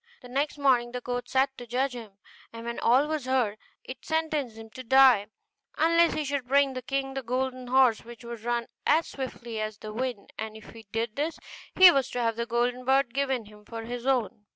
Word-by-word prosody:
The 250 - -11
next 285 +4 -1
morning 250 -4 +2
the 250 - -4
court 245 0 -4
sat 265 0 +1
to 245 - -9
judge 255 +3 0
him; 225 -5 -9 0.4
and 230 0 -9
when 235 0 -4
all 255 +5 +4
was 305 -3 -3
heard, 245 -5 0 0.2
it 255 - -9
sentenced 310 -7 -1
him 225 0 -11
to 255 - -8
die, 255 -4 +6 0.5
unless 335 +2 +4
he 305 - -2
should 275 -2 -2
bring 275 0 +3
the 255 - -5
king 270 +1 -2
the 270 - -3
golden 255 +1 -3
horse 255 -3 +4
which 235 +1 -12
could 235 -2 -8
run 240 0 -1 0.2
as 325 +2 +4
swiftly 240 -4 -6
as 215 -1 -4
the 215 0 -8
wind; 245 -3 -4
and 220 0 -5
if 220 - -13
he 225 -2 -14
did 225 0 -3
this, 310 +3 -1 0.4
he 370 -1 +10
was 270 -4 +1
to 245 - -4
have 230 -2 0
the 235 +1 -3
golden 245 +1 0
bird 265 -1 +2
given 265 -4 -1
him 210 0 -16
for 225 +1 -7
his 245 +2 -6
own. 240 -5 0
250 Hz, 220 wpm, -27 LUFS, 230-270 Hz, 0.5 s, he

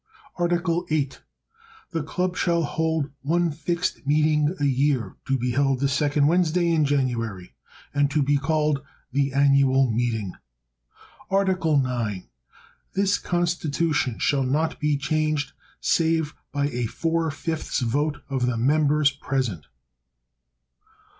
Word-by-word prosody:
Article 175 0 +1
VIII. 145 -3 0 0.8
The 165 - -1
Club 180 +4 -2
shall 170 -1 +1
hold 160 -1 -1
one 170 +4 +1
fixed 170 0 -3
meeting 150 +2 +2
a 145 - +1
year, 135 -6 +1
to 135 - +2
be 125 0 -1
held 135 0 +1
the 140 - +2
second 145 +1 +2
Wednesday 170 +1 +2
in 155 -2 +3
January, 120 -9 -1 0.4
and 145 0 +2
to 145 0 +1
be 145 +1 +2
called 150 0 0 0.3
the 140 +1 +1
annual 135 -2 +4
meeting. 110 -4 -1 1.0
Article 190 -5 +2
IX. 115 -7 -3 0.7
This 200 +1 +1
Constitution 165 -7 0
shall 140 -2 +1
not 145 +5 0
be 150 -1 +1
changed, 155 +1 -1 0.3
save 160 -2 +1 0.2
by 145 0 0
a 120 -3 -2
four 165 +5 -1
fifths 155 0 -3
vote 145 +5 -1
of 130 -3 -1
the 125 -2 0
members 145 +3 +3
present. 130 - -3
145 Hz, 125 wpm, -24 LUFS, 135-160 Hz, 1.0 s, annual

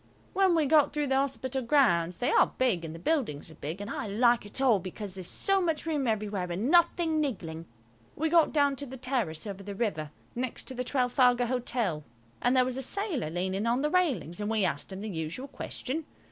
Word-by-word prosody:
When 380 -2 +4
we 320 -2 +3
got 295 0 +4
through 295 -1 0
the 265 -1 +1
Hospital 265 -1 -1
grounds–they 230 - +2
are - - +4
big 235 -10 +1
and 160 0 -6
the - - -7
buildings 170 - -1
are - - -11
big, 155 +5 -6
and 205 - -5
I 225 - -4
like 235 +2 +3
it 205 - -4
all 250 -7 +4
because 190 +2 -6
there's 185 -2 -4
so 390 -1 +2
much 325 -4 -1
room 295 -5 0
everywhere 205 -5 -1
and 210 - -1
nothing 340 -2 +3
niggling–we 160 - -5
got 330 -1 +4
down 285 -2 +3
to 285 - -5
the 265 +1 -8
terrace 240 - -2
over 200 -2 -6
the 200 0 -7
river, 160 -9 -2 0.2
next 250 0 -4
to - - -4
the 250 0 -3
Trafalgar 250 -1 +3
Hotel. 235 -9 -1 0.4
And 245 +2 +3
there 255 - +5
was 255 0 -3
a - - -2
sailor 310 - -2
leaning 190 +5 -1
on 245 +4 +1
the 300 - +1
railings, 250 - 0
and 205 - -2
we 220 -3 +2
asked 145 +1 -2
him 190 +1 -6
the 215 - -4
usual 170 - -4
question. 285 +2 -5
240 Hz, 210 wpm, -29 LUFS, 185-280 Hz, 0.4 s, there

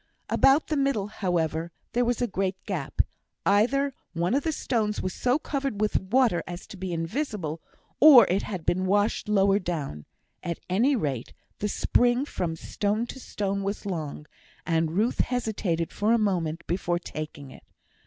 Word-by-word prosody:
About 275 +3 +5
the 305 - 0
middle, 275 -8 +1
however, 170 -5 -1 0.2
there 245 - +2
was 245 0 0
a - - +1
great 195 -2 -1
gap; 175 -10 -1 0.4
either 265 +8 +3 0.2
one 170 +4 0
of 280 - +3
the 320 - -1
stones 220 -8 -1
was 185 - -2
so 250 +2 +1
covered 275 -7 -3
with 215 0 +2
water 210 -3 +2
as 175 0 -7
to - - -11
be 185 -1 -5
invisible, 165 - -3 0.4
or 285 -5 +10
it 190 +3 +1
had 185 -6 -5
been 185 +1 +1
washed 205 +2 +1
lower 200 -1 +4
down; 150 - -4 0.4
at 170 -1 -3
any 235 +10 +3
rate, 140 - -2 0.3
the 210 - -1
spring 245 +5 +2
from 170 - -3
stone 205 +6 -1
to 265 - -8
stone 200 -5 -2
was 200 +2 -3
long, 155 -6 -4 0.4
and 165 -2 +1
Ruth 225 +4 +1
hesitated 205 -9 -1
for 210 +3 +1
a - - +5
moment 175 -7 -1
before 175 0 0
taking 155 -5 -7
it. - - -13
200 Hz, 165 wpm, -27 LUFS, 170-240 Hz, 0.4 s, or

